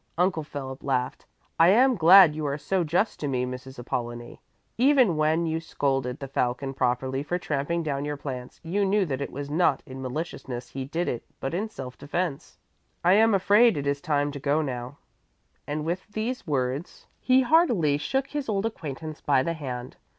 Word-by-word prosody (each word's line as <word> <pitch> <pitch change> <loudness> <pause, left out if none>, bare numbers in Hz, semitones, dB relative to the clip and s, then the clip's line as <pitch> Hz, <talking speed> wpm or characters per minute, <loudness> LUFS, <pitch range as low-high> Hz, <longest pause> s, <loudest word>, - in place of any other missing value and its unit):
Uncle 180 -2 +2
Philip 135 -3 -7
laughed: 130 -2 -2 0.3
"I 165 - +7
am 250 +8 +5
glad 175 -2 +8
you 155 0 -4
are 140 0 -1
so 185 +4 0
just 175 +7 0
to 145 - -2
me, 125 -2 0
Mrs. 130 +1 -8
Apollonie. 120 -1 -5 0.3
Even 255 - +4
when 155 +2 +2
you 160 0 -1
scolded 135 -5 -1
the 135 - -7
Falcon 135 +1 -1
properly 130 +1 0
for 175 +5 -2
tramping 165 +1 -2
down 140 -2 -2
your 145 0 -3
plants, 130 -3 -7
you 190 +5 0
knew 195 0 +2
that 135 -4 -3
it - - -4
was 140 +1 -6
not 160 -3 +2
in 130 0 -8
maliciousness 130 -2 -5
he 135 -1 -5
did 165 +6 -2
it 120 - -3 0.2
but 135 - -3
in 205 +6 -2
self 130 -10 -8
defence. 150 0 -3 0.5
I 180 +2 +5
am 220 +1 +5
afraid 205 +3 +5
it 140 - -3
is 140 0 -1
time 145 -1 0
to 140 - -7
go 145 +3 +1
now" 125 0 -5 0.7
and 150 +1 -3
with 175 +3 -3
these 220 +3 -3
words 140 +3 -2
he 260 0 +4
heartily 235 - +3
shook 270 - -1
his 290 -4 -4
old 200 0 0
acquaintance 155 -7 -5
by 135 -3 +3
the 170 - -1
hand. 130 -5 -6
150 Hz, 185 wpm, -26 LUFS, 135-180 Hz, 0.7 s, glad